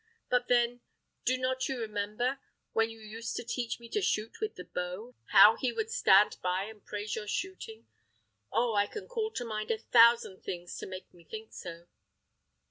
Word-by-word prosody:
And 250 0 +4
then, 240 0 +2 0.4
do 255 +1 +3
not 255 +1 -1
you 265 -2 -2
remember, 215 +4 -2 0.3
when 225 0 +2
you 225 0 -11
used 225 +2 -6
to - - -3
teach 240 0 -3
me 235 - -11
to 420 - 0
shoot 220 - -1
with 435 - -2
the 180 - -8
bow, 180 +8 -5
how 220 +2 +8
he 255 -3 0
would 440 - -3
stand 205 - +5
by 185 +1 0
and 210 0 -10
praise 210 0 -4
your 215 -1 -5
shooting? 380 - -4 0.7
Oh! 235 -1 +2
I 205 -1 +3
can 425 - -8
call 455 -3 -2
to 245 - -3
mind 215 -1 -4
a 225 - +1
thousand 230 -3 +5
things 175 -1 -5
to - - -6
make 185 0 -9
me 175 -1 -18
think 220 +5 -9
so." 170 -2 -8
225 Hz, 190 wpm, -31 LUFS, 205-250 Hz, 0.7 s, how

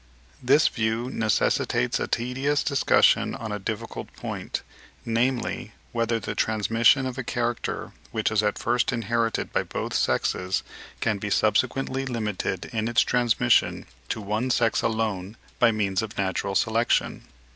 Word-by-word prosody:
This 140 +5 +5
view 115 +2 -1
necessitates 105 - +1
a - - -2
tedious 135 +4 0
discussion 140 -2 +3
on 110 -1 -6
a 105 - -3
difficult 110 +3 -5
point, - - -5 0.4
namely, 120 +2 -1 0.2
whether 115 -1 0
the 100 - -4
transmission 115 +5 +3
of 130 0 -4
a - - -2
character, 120 -1 -2 0.2
which 110 -1 -1
is 110 -1 +3
at 105 -1 0
first 120 +2 +1
inherited 115 -1 -1
by - - +2
both - - -4
sexes 90 +1 0 0.4
can 105 -2 0
be 105 - -3
subsequently 130 +5 +1
limited 105 -6 -2
in 110 -1 -1
its 115 -2 +4
transmission 120 - +2 0.2
to - - -2
one 105 +5 -1
sex 115 -3 +2
alone 110 -2 -2 0.2
by 120 -1 +5
means 100 -2 0
of 110 -1 -6
natural 95 0 -1
selection. 115 +3 +1
115 Hz, 140 wpm, -25 LUFS, 105-120 Hz, 0.4 s, This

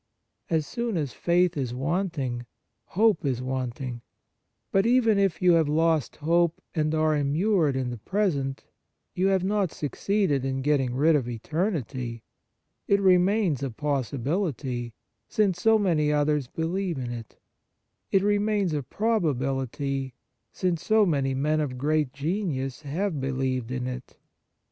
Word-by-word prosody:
As 160 -2 +1
soon 235 -2 -2
as 145 -7 -2
faith 175 +6 +2
is 130 -4 -2
wanting, 140 -5 -2 0.4
hope 215 -2 +2
is 130 -4 0
wanting; 130 -1 -4 0.7
but 195 +3 +3
even 230 -4 +4
if 190 -4 +1
you 180 - +6
have 160 -3 +3
lost 160 -2 +1
hope 170 +2 +1
and 155 -1 0
are 155 0 +2
immured 150 +2 +2
in 130 -2 -1
the 120 - -6
present, 140 - -1 0.5
you 185 +2 +1
have 190 -2 +2
not 195 -2 +1
succeeded 150 - 0
in 135 0 -2
getting 135 -4 +1
rid 155 +4 +4
of 130 -5 0
eternity; 125 - -3 0.6
it 200 - +4
remains 185 - +3
a 135 - -1
possibility, 135 - -2 0.3
since 190 -5 +1
so 225 +2 +5
many 165 -7 +2
others 150 -2 +1
believe 170 +3 -2
in 125 -2 -4
it; 115 -2 -8 0.7
it 195 -1 +3
remains 205 -3 +1
a 150 - 0
probability, 135 - -1 0.4
since 175 -3 -1
so 215 +2 +4
many 135 -6 0
men 150 +3 +1
of 130 -4 -3
great 150 0 +1
genius 145 -3 -2
have 155 +2 -2
believed 130 -2 -1
in 125 -1 -3
it. 125 0 -7
150 Hz, 140 wpm, -26 LUFS, 130-185 Hz, 0.7 s, you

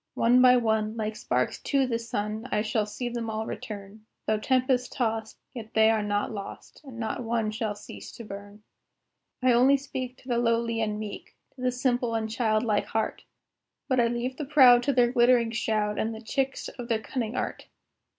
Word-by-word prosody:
One 245 +2 +4
by 250 0 +7
one, 220 -1 0
like 215 -1 -2
sparks 125 -11 -1
to 275 -1 +1
the 230 -2 -1
sun, 220 +1 -4
I 210 - +1
shall 215 -1 0
see 240 +4 -4
them 235 -1 -3
all 220 0 -3
return; 210 0 -8 0.2
Though 215 0 +1
tempest 255 +1 +1
tost, 225 -3 -2 0.2
yet 225 -3 -9
they 220 0 +6
are 220 -1 +1
not 205 +1 -1
lost, 200 -2 -8
And 265 -5 -11
not 230 +2 -3
one 225 -2 0
shall 215 -1 -2
cease 100 - -10
to 235 - -9
burn. 205 0 -10 0.8
I 255 -1 +5
only 260 +4 +5
speak 255 -2 -6
to - - -19
the 240 -2 +1
lowly 230 -1 +1
and 210 -1 -1
meek, 215 -2 -7 0.2
To 260 - -13
the 255 0 +1
simple 245 -2 0
and 220 -1 -1
child 220 -2 +1
like 215 -3 +1
heart, 220 0 -2 0.6
But 260 -1 +2
I 235 - +4
leave 240 +2 -3
the 300 - -4
proud 260 -4 +7
to 280 - +3
their 245 -2 +3
glittering 240 -2 +4
shroud, 215 -2 -1
And 225 +1 -1
the 220 - -9
tricks 270 +3 -2
of 245 -2 -8
their 230 -2 +1
cunning 230 0 -4
art. - - -4
230 Hz, 200 wpm, -27 LUFS, 215-250 Hz, 0.8 s, by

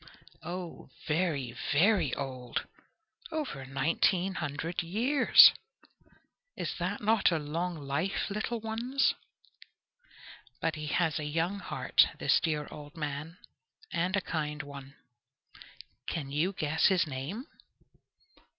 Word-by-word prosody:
Oh, 175 -4 -7 0.2
very, 150 -7 0 0.2
very 195 +7 +4
old! 130 -3 -4 0.7
Over 265 - -4
nineteen 165 +7 +1
hundred 160 +1 -3
years! 240 - +7 1.1
Is - - -2
that - - -2
not 215 -2 +3
a 165 - +2
long 165 +4 -3
life, 145 +6 -2
little 220 +3 -2
ones? 230 +5 +1 1.5
But 160 - 0
he 155 -1 -5
has 160 0 +1
a - - -4
young 165 +6 -1
heart - - +3
this - - +3
dear 150 -3 -1
old 150 +1 -10
man, 150 +2 -4 0.6
and 180 +3 +1
a 200 - +1
kind 150 -3 -3
one. 140 -1 -10 1.1
Can 140 -4 -3
you 155 +7 +1
guess 155 -2 +2
his 185 -4 +3
name? 150 - -5
165 Hz, 115 wpm, -30 LUFS, 145-190 Hz, 1.5 s, years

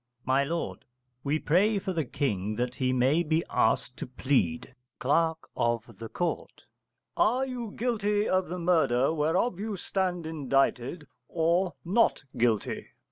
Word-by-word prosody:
My 130 +2 +3
lord, 165 +4 -3 0.4
we 145 +2 +1
pray 195 +8 +2
for 190 -1 -2
the 160 -4 -1
King 105 -6 -2
that 125 +2 -1
he 130 -1 0
may 130 +6 +3
be 160 0 +1
asked 120 +3 +1
to - - -5
plead. 125 - 0 0.3
Cl. 160 +4 +2 0.2
of 120 -1 -1 0.2
Ct. 175 -1 -3 0.5
Are 260 +2 +2
you 245 -4 -5
guilty 210 -3 +1
of 185 0 +1
the 180 +3 -4
murder 160 -6 +2
whereof 170 +7 +1
you 210 -1 -3
stand 180 -2 -2
indicted, 140 -1 0 0.2
or 170 +2 +1
not 205 -2 +2
guilty? 115 -3 0
160 Hz, 135 wpm, -28 LUFS, 130-185 Hz, 0.5 s, My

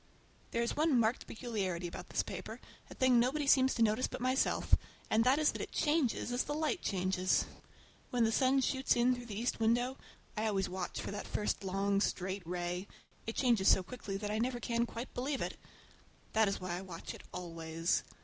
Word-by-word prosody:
There 235 - 0
is 235 - -1
one 300 -4 +3
marked 230 +2 +1
peculiarity 200 -7 -3
about 170 - -7
this - - 0
paper, - - -6 0.3
a - - -10
thing 255 -2 +4
nobody 275 +5 +1
seems 265 -1 +5
to 230 - +3
notice 220 +3 +2
but - - -6
myself, 255 +1 +1 0.4
and 220 +1 +4
that 260 +3 +5
is 305 -1 +3
that - - -5
it - - -5
changes 295 -6 +1
as 245 +1 0
the 295 - -2
light 315 +3 0
changes. 185 -1 +1 0.6
When 245 -2 +2
the 225 - +3
sun 265 +3 +3
shoots 265 0 +2
in 245 +1 +4
through 245 -1 -6
the 210 -2 -4
east 240 0 -1
window—I 230 -1 -1
always 195 -3 +1
watch 180 0 -4
for - - -4
that 205 - -5
first 210 -1 -1
long, 195 +1 +1
straight 190 0 -1
ray—it 180 +5 -5
changes 235 -7 +3
so 190 - +6
quickly 200 -1 -5
that 205 +1 -3
I 215 - 0
never 245 +1 0
can 235 +1 0
quite 235 +3 -7
believe 270 +2 -2
it. - - -3 0.8
That 220 -1 +4
is 195 - -1
why 180 -1 -3
I - - -7
watch 180 -3 -7
it - - -10
always. 165 -1 -1
225 Hz, 195 wpm, -34 LUFS, 190-255 Hz, 0.8 s, so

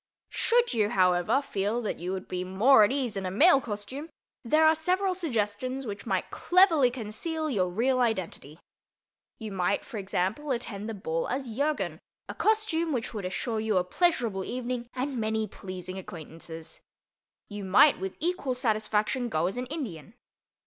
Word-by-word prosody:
Should 480 - +2
you, 215 -3 +2
however, 180 +8 +3
feel 210 -1 -1
that 215 - -3
you 180 +2 -3
would 190 0 -4
be 180 0 -3
more 210 +7 +5
at 210 - +3
ease 260 -6 -1
in 195 - -3
a 185 - -2
male 275 - +5
costume, 245 +8 -6 0.3
there 310 +7 +4
are 315 - +7
several 365 +4 +1
suggestions 255 - -2
which 205 -3 -6
might - - -1
cleverly 345 -8 +4
conceal 265 +7 -4
your 185 -6 +1
real 250 +8 +1
identity. 185 - -2 0.8
You 220 -2 -7
might, 190 0 0
for 220 - -6
example, 195 +9 -2
attend 225 -4 -3
the 225 - -4
ball 165 -4 -2
as 255 -3 -3
Jurgen—a 215 - -3
costume 415 -7 +1
which 245 -2 -3
would 205 -4 -4
assure 215 +5 -2
you 215 -2 +1
a 180 - +3
pleasurable 230 - +1
evening 245 +1 -4
and 260 0 -2
many 220 0 0
pleasing 185 -1 -7
acquaintances. 165 -2 -9 0.7
You 205 -1 -7
might, 195 +10 +5
with 190 0 -4
equal 315 -6 -1
satisfaction, 220 +1 0
go 155 -4 0
as 190 - -1
an 250 +1 -3
Indian. 230 - -6
225 Hz, 165 wpm, -28 LUFS, 190-275 Hz, 0.8 s, are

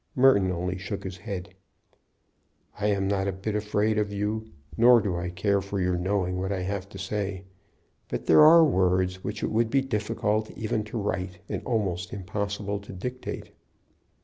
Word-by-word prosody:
Merton 125 -8 +5
only 90 +1 -2
shook 100 +2 -5
his 95 -1 -6
head. 95 -2 -6 1.3
"I'm 100 -2 +1
not 100 -1 0
a - - +1
bit 95 +3 -4
afraid 105 +1 +1
of 105 -1 -1
you, 105 +2 -2 0.3
nor 120 +1 +7
do 100 -4 -1
I 90 +1 -3
care 100 +3 +1
for 100 +1 -4
your 90 -1 +1
knowing 90 0 0
what 95 +1 -2
I 95 -2 -1
have 100 0 -3
to 100 - -10
say. 95 0 -3 0.6
But - - -4
there - - +7
are 165 +1 +9
words 95 -6 +1
which 105 - -4
it - - -1
would 115 +1 +2
be 135 +3 +3
difficult 110 -3 -1
even 110 -1 -1
to 110 +2 -5
write, 95 -3 -2
and - - -3
almost 95 -7 -1
impossible 100 +1 -3
to 100 - -11
dictate." 125 +7 -6
100 Hz, 175 wpm, -27 LUFS, 95-110 Hz, 1.3 s, are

